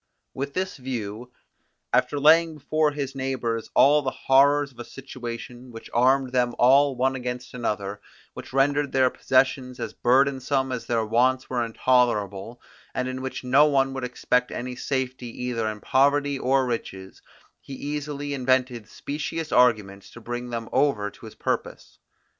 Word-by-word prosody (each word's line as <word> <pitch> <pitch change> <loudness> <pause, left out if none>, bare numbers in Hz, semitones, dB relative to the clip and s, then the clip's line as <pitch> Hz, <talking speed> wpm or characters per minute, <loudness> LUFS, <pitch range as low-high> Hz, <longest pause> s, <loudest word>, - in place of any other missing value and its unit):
With 140 +1 -5
this 190 0 -2
view, 120 -2 -6 0.6
after 125 +3 +2
laying 160 +2 +5
before 155 +1 +1
his 140 -2 -4
neighbours 130 -4 -3
all 150 +2 +6
the 135 - -1
horrors 140 +2 +3
of 120 - -21
a - - -5
situation, 125 -1 -8
which 115 -1 -11
armed 130 +2 +3
them 125 -2 +1
all 135 +2 +5
one 130 +2 +1
against 125 -1 -5
another, 105 -4 -3 0.3
which - - -10
rendered 140 +1 +1
their 130 -1 +3
possessions 130 -1 +1
as 115 - -5
burdensome 135 +1 +1
as 125 -2 -5
their 115 -2 0
wants 125 +4 +1
were 120 -2 0
intolerable, 115 -2 0 0.4
and 125 - -1
in 130 0 -4
which 130 0 -5
no 135 +4 +5
one 135 -2 +2
could 130 -1 -5
expect 125 0 0
any 125 +1 -5
safety 130 -1 -3 0.2
either 115 -3 -1
in 105 0 -6
poverty 140 +1 +2
or 130 +1 +2
riches, 95 -6 -5 0.4
he 140 - -11
easily 145 0 -4
invented 130 -4 0
specious 155 +2 -5
arguments 105 -6 +2
to - - -12
bring 120 +1 -5
them 115 -1 -4
over 130 -7 +1
to - - -13
his - - -12
purpose. - - -4
130 Hz, 155 wpm, -25 LUFS, 120-140 Hz, 0.6 s, all